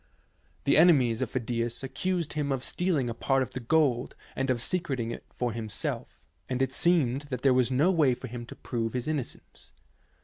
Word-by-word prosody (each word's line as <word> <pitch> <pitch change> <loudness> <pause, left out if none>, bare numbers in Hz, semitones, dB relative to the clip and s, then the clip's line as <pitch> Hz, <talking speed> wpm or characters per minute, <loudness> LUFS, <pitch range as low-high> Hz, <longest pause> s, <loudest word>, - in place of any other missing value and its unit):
The 140 - +4
enemies 135 -9 +5
of 130 - -1
Phi - - -2
dias 120 +1 -2
accused 175 +4 -2
him 145 -2 -1
of 130 -2 -1
stealing 170 -8 0
a 115 - -2
part 135 +3 +1
of - - -7
the 130 - -5
gold 125 -1 +1 0.2
and 135 0 -1
of 125 -2 +1
secreting 135 -5 -1
it - - -7
for 125 -1 -2
himself, 110 -2 -4 0.3
and 125 -1 -1
it 135 - 0
seemed 145 -6 +2
that 125 -3 -4
there 135 -2 +5
was 125 -1 +3
no 140 +8 +3
way 150 -8 +3
for 130 - -9
him 120 -1 -7
to - - -9
prove 115 -2 -3
his 125 +1 -2
innocence. 150 -5 -5
130 Hz, 200 wpm, -28 LUFS, 120-150 Hz, 0.3 s, enemies